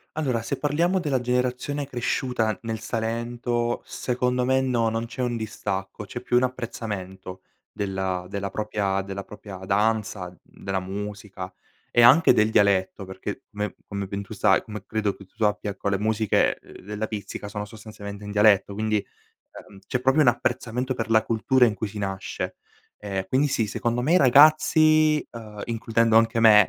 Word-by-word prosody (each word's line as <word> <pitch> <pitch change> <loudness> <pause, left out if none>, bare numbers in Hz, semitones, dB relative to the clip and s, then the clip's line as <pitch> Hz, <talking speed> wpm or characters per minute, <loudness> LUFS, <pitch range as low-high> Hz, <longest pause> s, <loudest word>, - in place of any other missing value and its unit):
Allora, 130 -7 0
se 115 - -3
parliamo 170 +6 +1
della 145 -7 0
generazione 125 +3 -1
cresciuta 120 -4 -1
nel 115 -1 -3
Salento, 120 +2 -2
secondo 125 0 -1
me 130 +1 +3
no, 120 -4 +1
non 115 +1 -2
c'è 120 - -6
un 120 -2 -1
distacco, 100 -2 -4
c'è 120 +5 -7
più 120 - -1
un 125 - +3
apprezzamento, 95 -7 -5 0.3
della 95 -2 -2
della 100 +1 -4
propria 100 -2 -1
della 100 0 -6
propria 105 -2 -10
danza, 100 0 0
mhmm, 90 - -19 0.3
della 95 -1 -1
musica 100 0 -6 0.4
e 120 - +4
anche 125 +5 +7
del 110 -2 +3
dialetto 100 -2 +2
perché, 95 0 -6
beh, 105 -1 -4
come 100 -1 -4
ben 100 +1 -4
tu 100 - -9
sai 95 -1 +3
come 105 -3 -8
credo 110 -2 -1
che 100 - -14
tu 95 - -35
sappia 105 -1 0
ecco 100 0 -5
le 100 -1 0
musiche, 110 0 +2
uhm, - - -16
della 105 +2 -4
Pizzica 105 -1 -6
sono 105 0 -5
sostanzialmente 105 -1 -9
in 105 - -6
dialetto, 105 -1 +4
quindi, 110 +1 0 0.4
ehm, 100 - -15
c'è 125 - -1
proprio 135 +4 +4
un 140 - +5
apprezzamento 125 +1 0
per 115 -3 -3
la 110 -1 +5
cultura 120 +3 +3
in 115 - +3
cui 105 +1 -3
si 105 - -12
nasce. 95 -1 -4 0.5
Ehm, 95 -2 -3
quindi 135 +6 +2
sì, 115 -5 0
secondo 120 +4 -1
me 150 +7 +2
i - - +6
ragazzi, 155 +2 +5
ehm, 105 -3 -9
includendo 115 -1 +1
anche 115 +1 +2
me 105 -3 +7
110 Hz, 175 wpm, -25 LUFS, 100-125 Hz, 0.5 s, anche